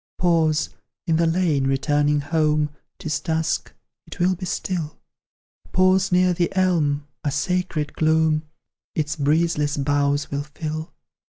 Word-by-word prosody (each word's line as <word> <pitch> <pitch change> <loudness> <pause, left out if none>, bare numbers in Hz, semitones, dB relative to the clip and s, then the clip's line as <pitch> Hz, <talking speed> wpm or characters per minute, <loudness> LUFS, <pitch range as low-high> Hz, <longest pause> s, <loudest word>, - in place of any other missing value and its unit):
Pause, 165 -3 +2 0.3
in 165 -3 +2
the 165 0 +3
lane, 165 -5 +1
returning 145 +2 +2
home; 150 0 +1 0.3
'Tis 155 -6 -2
dusk, 160 0 -1 0.4
it - - -10
will 180 +2 +3
be 185 0 -5
still: 170 -4 -3 0.8
Pause 185 +1 +3
near 180 0 +4
the 175 0 0
elm, 155 -6 +1 0.2
a 145 - 0
sacred 155 0 -1
gloom 160 -1 +2 0.5
Its 150 -1 -1
breezeless 150 0 +1
boughs 145 0 +1
will 140 0 -1
fill. 155 +2 -5
155 Hz, 125 wpm, -23 LUFS, 145-175 Hz, 0.8 s, near